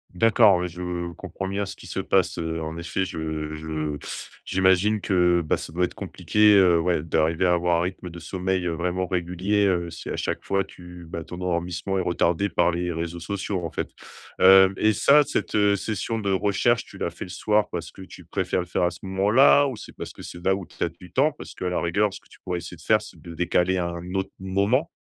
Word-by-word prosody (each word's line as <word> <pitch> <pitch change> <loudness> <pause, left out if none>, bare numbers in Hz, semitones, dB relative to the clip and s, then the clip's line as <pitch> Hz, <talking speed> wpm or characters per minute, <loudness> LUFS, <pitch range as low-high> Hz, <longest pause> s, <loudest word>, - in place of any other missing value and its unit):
D'accord, 110 0 +5
ouais, 90 0 -2
je 85 0 -4
comprends 95 +2 -6
bien 100 +1 -1
ce 95 - -7
qui - - -14
se - - -4
passe, 90 -2 +1
heu, 80 0 -3
en 80 +1 -5
effet, 85 +3 -2
je 80 -3 -4
je 75 -1 -4 0.5
j'imagine 95 +3 +3
que, 90 -3 +3
bah, - - +1
ça 80 - -8
doit 90 - 0
être 90 - -1
compliqué, 105 -1 +3
heu, 90 -3 +5
ouais 85 -2 0
d'arriver 80 +2 +1
à 90 - +4
avoir 85 -1 +2
un - - +1
rythme 90 0 -5
de 85 - -10
sommeil, 95 +2 -2
heu, 85 - 0
vraiment 90 +2 -1
régulier, 90 +3 0
heu, 90 -3 +1
si 85 - -8
à - - -2
chaque - - -3
fois 100 0 +1
tu 90 -1 -12
bah, 85 -1 -6
ton 90 - -8
endormissement 90 +1 -2
est - - +1
retardé 90 +2 +1
par 85 -3 +2
les 85 0 -2
réseaux 85 +1 -4
sociaux 95 +1 -3
en - - -3
fait, 75 - -4 0.5
hem 95 +1 +7
et 110 0 +3
ça 145 +8 +5
cette 105 -6 +1
session 110 +2 -3
de 100 -2 -1
recherche, 100 +5 +2
tu - - -13
la - - -2
fais - - -8
le - - -12
soir 105 +2 +1
parce 85 -2 -5
que - - -13
tu 95 - -12
préfères 90 - -1
le - - -6
faire 90 - -1
à 90 - +2
ce 85 - -12
moment-là? 105 +9 +4
Ou 130 - -4
c'est 105 - -11
parce - - -7
que - - -12
c'est 85 0 -9
là 95 0 +3
où 95 - -6
tu 85 - -20
as - - +1
du 85 +1 -16
temps? 145 +6 +2
Parce - - -10
qu'à 90 - -3
la 90 - -1
rigueur, 100 +4 +1
ce - - -9
que - - -27
tu - - -18
pourrais 90 -1 -3
essayer - - -9
de - - -17
faire, - - +3
c'est - - -13
de 85 - -9
décaler 90 +2 +1
à 85 -1 0
un 85 +1 -7
autre 95 0 -2
moment? 100 - +1
90 Hz, 240 wpm, -24 LUFS, 85-100 Hz, 0.5 s, hem